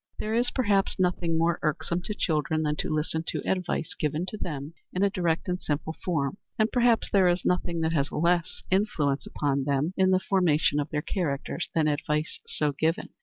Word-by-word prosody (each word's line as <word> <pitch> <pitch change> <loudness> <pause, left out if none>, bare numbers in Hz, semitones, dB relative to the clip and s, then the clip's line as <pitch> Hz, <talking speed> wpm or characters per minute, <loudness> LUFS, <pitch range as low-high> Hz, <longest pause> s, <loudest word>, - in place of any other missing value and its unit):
There 215 - -3
is, 240 +2 +2
perhaps, 205 -6 +1
nothing 180 -3 +1
more 165 0 +2
irksome 170 +3 -1
to 210 - -3
children 155 -2 0
than 150 -1 0
to 185 - -1
listen 155 +1 -1
to - - -3
advice 180 -3 -1
given 150 +3 -1
to 215 - -6
them 150 -4 -5 0.2
in 185 - 0
a 200 - +3
direct 170 -3 0
and 180 0 -2
simple 155 +2 -2
form, 150 -2 -1 0.2
and 220 0 +2
perhaps 240 -2 +3
there 190 -2 +5
is 175 0 0
nothing 175 -2 0
that 160 0 +1
has 145 -3 0
less 170 +1 0
influence 155 -8 +1
upon 140 -2 -1
them 145 +5 0
in 190 0 +3
the 185 0 +4
formation 165 -7 +2
of 145 +1 -2
their 150 -1 -2
characters 165 -2 -2
than 160 -2 +3
advice 150 +1 -1
so 150 -1 0
given. 160 +4 -1
165 Hz, 195 wpm, -27 LUFS, 150-185 Hz, 0.2 s, there